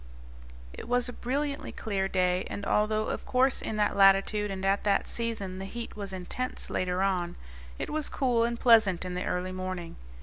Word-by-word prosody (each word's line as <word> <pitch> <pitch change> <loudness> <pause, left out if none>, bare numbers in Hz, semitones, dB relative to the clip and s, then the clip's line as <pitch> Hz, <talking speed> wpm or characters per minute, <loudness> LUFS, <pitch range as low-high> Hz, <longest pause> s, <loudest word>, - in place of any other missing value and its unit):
It - - -8
was 245 0 +2
a 245 - -3
brilliantly 280 +4 -2
clear 195 -3 -2
day, 180 -1 +1
and, 200 - -5
although 215 +1 +1
of - - -3
course 260 +1 +2
in 215 - -3
that 210 -1 +1
latitude 195 +1 +4
and 190 -1 -4
at 195 +1 +2
that 200 -1 +2
season 210 -5 -3
the 195 - -5
heat 235 +4 -6
was 200 -2 -5
intense 190 +7 -5
later 185 +1 0
on, 180 -3 0 0.4
it - - -4
was 310 -1 -1
cool 245 -4 +1
and 235 0 -1
pleasant 220 -7 +5
in 180 - -4
the 180 - -3
early 180 +1 -2
morning. 185 -2 -5
200 Hz, 190 wpm, -29 LUFS, 185-235 Hz, 0.4 s, pleasant